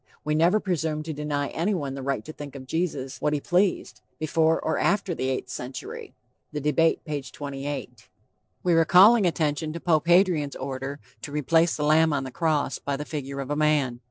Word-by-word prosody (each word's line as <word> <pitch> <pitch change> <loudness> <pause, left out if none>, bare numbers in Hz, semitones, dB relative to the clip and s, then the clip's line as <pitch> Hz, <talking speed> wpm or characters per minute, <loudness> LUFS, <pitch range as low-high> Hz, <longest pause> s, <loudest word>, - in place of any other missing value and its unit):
We 150 - -1
never 170 +7 +4
presumed 160 -6 -2
to 160 - -4
deny 145 -1 -2
anyone 165 -6 -1
the 135 - -6
right 135 -5 -2
to 155 - -8
think 145 -2 -9
of 130 -1 -8
Jesus 145 -3 -3
what 150 - +1
he 150 - 0
pleased, 180 +6 0 0.2
before 160 +1 +2
or 160 - -1
after 200 -3 +1
the 130 -4 -2
eighth 130 -1 -3
century. 125 +2 -7 0.4
(The 150 - -3
Debate, 150 +3 +1
p. 150 -2 -3
28.) 135 -1 -7 0.5
We 180 - +3
were 165 0 +5
calling 190 +6 +6
attention 155 -1 -1
to 170 - -5
Pope 160 -2 +1
Hadrian's 170 -6 +3
order 135 +1 -5 0.2
to - - -7
replace 160 +3 +2
the 150 - -2
lamb 155 +1 +4
on 140 -2 0
the 130 - -6
cross 155 0 0
by 140 -1 -3
the 150 - -5
figure 140 -3 -5
of 135 +1 -6
a - - +1
man. 145 -5 +1
150 Hz, 195 wpm, -25 LUFS, 140-165 Hz, 0.5 s, calling